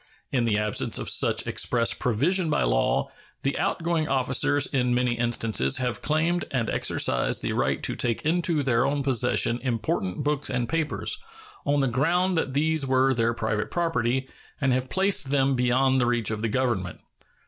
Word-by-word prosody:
In 125 -3 +1
the 105 -3 +1
absence 105 0 -1
of - - -2
such - - +1
express 115 -2 +1
provision 160 - 0
by 150 - +1
law, - - +1 0.3
the 135 - 0
outgoing 165 -2 -1
officers 140 +2 +2
in 125 -3 0
many 125 0 +1
instances 120 +2 0
have 125 -2 -2
claimed 165 +3 0
and 120 -4 -1
exercised - - 0
the - - -1
right 65 +1 -1
to - - -1
take 115 -2 -1
into 165 -2 +1
their 120 -2 +2
own 140 +1 0
possession 125 -2 +2
important 115 -4 -2
books 145 0 -1
and 125 -2 -1
papers, 160 +3 -1 0.5
on 145 0 +2
the 135 - +1
ground 170 +9 +1
that 140 -5 -1
these 155 +1 +2
were 130 0 +2
their 115 -1 0
private 110 -2 -2
property, 135 -7 -1 0.3
and 135 -2 +1
have 130 0 -2
placed 190 -7 +1
them 135 -1 +2
beyond 130 +1 +2
the 120 - +1
reach 120 -3 0
of 110 -1 -3
the 115 - -1
Government. 110 -7 -1
130 Hz, 170 wpm, -25 LUFS, 115-145 Hz, 0.5 s, officers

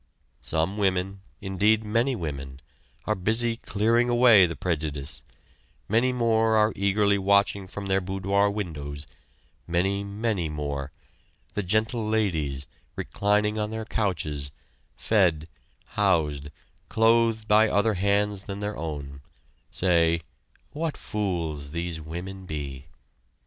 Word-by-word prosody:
Some 80 +6 -1
women, 95 -1 0 0.2
indeed 105 +3 +2
many 115 +5 +1
women, 70 - -5 0.5
are 110 - +1
busy 115 +4 +1
clearing 115 +2 +1
away 120 -6 +7
the 85 - -5
prejudice; 75 -5 -3 0.7
many 115 +5 +3
more 115 -2 +2
are 110 0 +3
eagerly 100 +1 +2
watching 100 0 +2
from 100 +2 -7
their 95 0 +1
boudoir 100 +2 +1
windows; 75 -8 -5 0.6
many, 95 +4 0
many 100 -4 -2
more 70 -2 -4 0.6
the 105 - -1
"gentle 110 +5 0
ladies," 80 -11 0 0.3
reclining 105 +1 0
on 105 0 -1
their 110 0 -4
couches, 75 -10 -2 0.5
fed, 85 -8 +2 0.4
housed, 75 -8 +1 0.4
clothed 115 -1 +3
by 105 +1 +5
other 105 +2 +2
hands 100 +1 0
than 100 0 -5
their 105 0 -3
own 70 -3 -6 0.5
say: 85 -2 +2 0.5
"What 160 0 -3
fools 85 -8 -3
these 85 -1 -3
women 90 +4 -7
be!" 70 -3 -6
100 Hz, 115 wpm, -26 LUFS, 80-110 Hz, 0.7 s, away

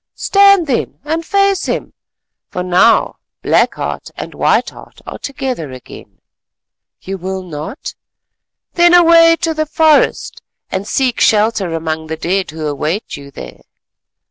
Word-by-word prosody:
Stand 395 -3 +4
then 265 -6 -2
and 320 +3 -2
face 395 +1 +1
him, - - -3 0.6
for 180 -2 -4
now 185 +6 +3 0.3
Black - - +2
Heart - - -5
and - - -7
White - - +1
Heart - - -15
are - - -8
together 260 - -5
again. 130 -1 -13 0.8
You 195 0 -6
will 190 +1 -5
not? 160 - -7 0.8
Then 345 0 +5
away 335 -1 +6
to 325 -1 0
the 310 0 -2
forest 315 -1 +2 0.3
and 190 +2 -3
seek 255 -2 0
shelter 210 -5 +2
among 160 -1 -4
the 160 0 -5
dead 185 +4 -1
who 155 0 -6
await 150 +7 -3
you 140 0 -11
there. 60 - -11
215 Hz, 140 wpm, -15 LUFS, -, 0.8 s, away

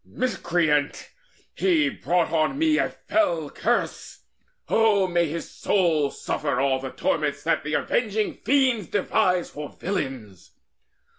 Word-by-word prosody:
Miscreant, 170 - -1 0.4
he 330 -6 +2
Brought 180 -9 0
on 160 - +1
me 315 0 +2
a - - +1
fell 170 - -1
curse! - - -2 0.5
O 215 -3 +3
may 175 -2 +1
his 165 +2 -5
soul 165 -7 +1
Suffer 140 -3 -2
all 135 -1 +1
torments 150 -3 -1
that 165 - +1
the 150 +1 -2
Avenging 215 -3 0
Fiends 255 - +2
Devise 180 -2 +1
for 150 0 -7
villains! 130 - -5
175 Hz, 120 wpm, -24 LUFS, 150-220 Hz, 0.5 s, O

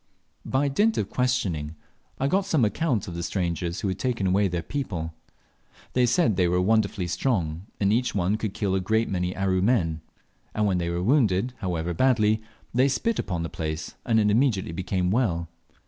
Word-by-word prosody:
By 135 +2 +1
dint 210 +11 +2
of 100 - -2
questioning, 95 -12 -1 0.4
I 135 - +1
got 195 +5 +1
some 155 - +3
account 120 - 0
of 90 - -6
the 85 - -4
strangers 85 -1 -2
who - - -1
had 95 0 -2
taken 120 -3 -1
away 95 +2 +3
their 90 -2 -3
people. 90 - -4 0.8
They 125 -1 +3
said 140 - +2
they 90 -2 +3
were 90 +1 +2
wonderfully 100 -1 +1
strong, 90 -2 -1
and 100 0 +3
each 125 0 0
one 100 +2 +1
could 110 -3 -4
kill 100 -3 0
a 95 - +2
great 110 +5 +1
many 90 -1 -1
Aru 95 -1 +1
men; 90 -8 +1 0.5
and 105 - +1
when 95 -3 +1
they 85 -1 -1
were 85 +1 -2
wounded, 115 -2 +2
however 90 -2 -2
badly, 110 0 +3 0.3
they 130 +3 +4
spit 170 - 0
upon 85 -3 -2
the - - -2
place, 80 0 -4
and 115 -2 +2
it 105 -1 +3
immediately 110 -6 +2
became 90 +1 -1
well. 95 -8 +1
100 Hz, 190 wpm, -26 LUFS, 90-120 Hz, 0.8 s, they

